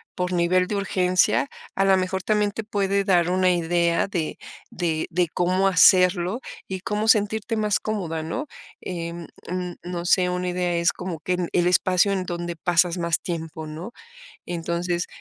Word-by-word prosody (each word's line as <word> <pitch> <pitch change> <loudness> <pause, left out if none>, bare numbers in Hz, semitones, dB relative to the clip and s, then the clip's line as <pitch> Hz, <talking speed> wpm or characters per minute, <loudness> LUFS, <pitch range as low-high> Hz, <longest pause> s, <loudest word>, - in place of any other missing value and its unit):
por 180 0 -2
nivel 180 +1 +2
de 210 - -2
urgencia, 185 +3 +2 0.3
a 195 - +2
la 195 0 +5
mejor 185 0 -2
también 210 -1 +2
te 225 - -5
puede 200 -2 0
dar 175 -3 +3
una 185 0 +3
idea 170 0 +1
de 175 -5 -3 0.3
de 165 -3 -1
de 175 0 +1
cómo 185 +2 +1
hacerlo 180 +3 +4 0.3
y 190 -1 -4
cómo 210 +1 -2
sentirte 220 +1 +2
más 210 -2 +1
cómoda, 175 -7 -3
¿no? 215 - -4 0.3
Em, 170 -2 -5 0.2
mm, 180 0 -3
no 175 -1 -5
sé, 180 0 +3
una 180 0 -2
idea 180 0 -1
es 170 0 +3
como 180 -3 -6
que 180 +2 -1 0.2
el 175 0 +3
espacio 185 +2 +3
en 190 -1 -1
donde 175 -1 -4
pasas 175 +1 +2
más 170 -1 0
tiempo, 160 -3 -5
¿no? 160 +8 -7 0.5
Entonces, 175 +1 -2
180 Hz, 165 wpm, -24 LUFS, 170-190 Hz, 0.5 s, la